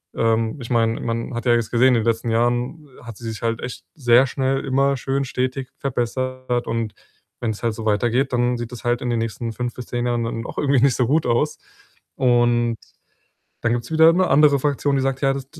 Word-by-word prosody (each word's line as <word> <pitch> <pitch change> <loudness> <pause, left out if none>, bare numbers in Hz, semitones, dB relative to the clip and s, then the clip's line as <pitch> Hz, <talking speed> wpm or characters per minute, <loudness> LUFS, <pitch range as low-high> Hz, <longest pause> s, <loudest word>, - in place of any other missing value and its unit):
ähm, 115 +3 +1
ich 120 0 -8
meine, 115 -1 +2
man 115 +2 -3
hat 120 - -4
ja 120 - +4
jetzt 115 -2 0
gesehen, 125 +2 +4
in - - +4
den 115 - +1
letzten 115 0 0
Jahren 120 +6 0 0.2
hat 115 -3 -9
sie 115 - -8
sich 110 -2 -7
halt 115 0 -1
echt 125 - -7
sehr 125 -2 +4
schnell 135 +2 -1
immer 135 +1 +2
schön 135 +2 -1
stetig 130 +1 -3
verbessert 130 -1 -2
und 115 -2 -2 0.5
wenn's 110 -3 -3
halt 115 -2 0
so 110 - -7
weitergeht, 120 +5 +1
dann 120 0 +1
sieht 120 0 -6
das 120 - -9
halt 120 0 0
in 125 - -2
den 115 - 0
nächsten 115 +1 -3
5 120 +1 -4
bis 125 - -7
10 120 0 -2
Jahren 120 -1 0
dann 115 +1 -4
auch - - -9
irgendwie 140 -3 +2
nicht 135 -3 +4
so 125 -3 +1
gut 150 +2 +2
aus.“ 120 +6 +1 0.6
Und 120 -2 +2 0.9
dann 120 -1 +1
gibt's 120 +4 -3
wieder 160 +1 +6
'ne 185 +1 +2
andere 145 0 +5
Fraktion, 145 0 0
die 135 - +1
sagt: 135 +1 -1
„Ja, 135 0 +3
das 135 -1 -5
120 Hz, 220 wpm, -21 LUFS, 115-135 Hz, 0.9 s, wieder